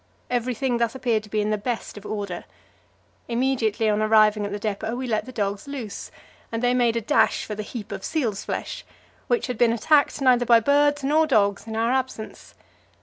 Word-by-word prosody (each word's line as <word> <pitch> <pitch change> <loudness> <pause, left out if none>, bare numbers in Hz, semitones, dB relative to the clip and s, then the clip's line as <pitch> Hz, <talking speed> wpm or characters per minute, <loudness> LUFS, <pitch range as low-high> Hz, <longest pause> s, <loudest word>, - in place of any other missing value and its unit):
Everything 245 0 0
thus 235 +1 0
appeared 235 -4 0
to 210 - -15
be 215 +1 0
in 210 +1 -1
the 210 - 0
best 235 +2 -4
of 205 0 -9
order. 200 -4 -4 0.8
Immediately 235 -3 0
on 210 0 +2
arriving 215 -1 +4
at - - -7
the 205 - -3
depot 215 +2 -3
we 255 +1 -4
let 220 -3 -1
the - - -7
dogs 200 -1 -3
loose, 255 -7 -6 0.4
and 230 +1 -3
they 245 0 +3
made 240 -2 +2
a 230 - 0
dash 210 - +2
for 215 - -5
the 210 - -4
heap 210 0 -7
of 195 -1 -6
seal's 230 -11 -1
flesh, - - -4 0.4
which 480 -2 +1
had 250 -4 -5
been 240 -2 +5
attacked 285 +7 +2
neither 255 -3 +4
by 235 -1 +7
birds 290 +3 +2
nor 310 +3 +3
dogs 205 -5 +2
in 220 - -5
our 230 +2 +1
absence. 260 -4 -4
230 Hz, 205 wpm, -24 LUFS, 215-255 Hz, 0.8 s, by